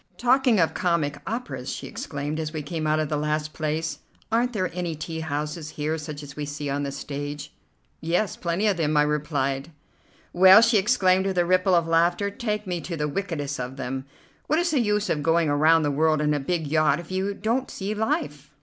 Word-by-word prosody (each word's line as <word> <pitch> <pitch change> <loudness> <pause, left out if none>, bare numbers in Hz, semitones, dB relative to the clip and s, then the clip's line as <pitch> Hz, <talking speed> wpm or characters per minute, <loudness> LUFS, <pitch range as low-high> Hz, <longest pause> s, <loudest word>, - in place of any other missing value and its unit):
"Talking 250 -2 +3
of 165 - +2
comic 155 -5 0
operas," 245 +3 -4
she - - -6
exclaimed 145 +2 -4
as 155 -1 -3
we 155 -2 -4
came 155 +1 -3
out 155 0 +2
of 155 -1 0
the 150 0 -1
last 150 0 -1
place, 155 -1 -2 0.3
"Aren't 240 +2 +2
there 185 -6 -2
any 175 -3 -2
tea 160 +1 -5
houses 150 0 -4
here, 155 +1 -2
such 150 -1 -7
as 140 -1 -10
we 150 - -4
see 145 0 -4
on 140 +1 -1
the 140 -1 -3
stage?" 145 +1 -6 0.5
"Yes, 175 +6 0
plenty 170 +4 -1
of 205 -4 +2
them," 155 -2 +1
I 150 - +6
replied. 145 -1 -1 0.6
"Well," 190 +4 +8
she 230 -2 +4
exclaimed 190 -3 +3
with 190 -1 -2
a 175 - +3
ripple 185 +1 +3
of 170 -1 +3
laughter, 170 +4 +2
"take 210 -2 -3
me 175 -3 -3
to 170 -1 -5
the 150 -1 -1
wickedest 145 -5 -3
of 125 +1 -5
them. 130 0 -4 0.4
What 310 - +2
is 345 +1 +1
the 295 - +2
use 210 -2 +1
of 150 - 0
going 165 +1 +2
around 155 +3 +4
the 145 - +1
world 155 +2 +2
in 150 0 +1
a 145 - 0
big 160 +3 -2
yacht 155 0 +2
if 175 +1 -10
you 190 +2 -1
don't 230 +6 -1
see 200 +2 -4
life?" 150 -10 -2
160 Hz, 215 wpm, -25 LUFS, 150-190 Hz, 0.6 s, Well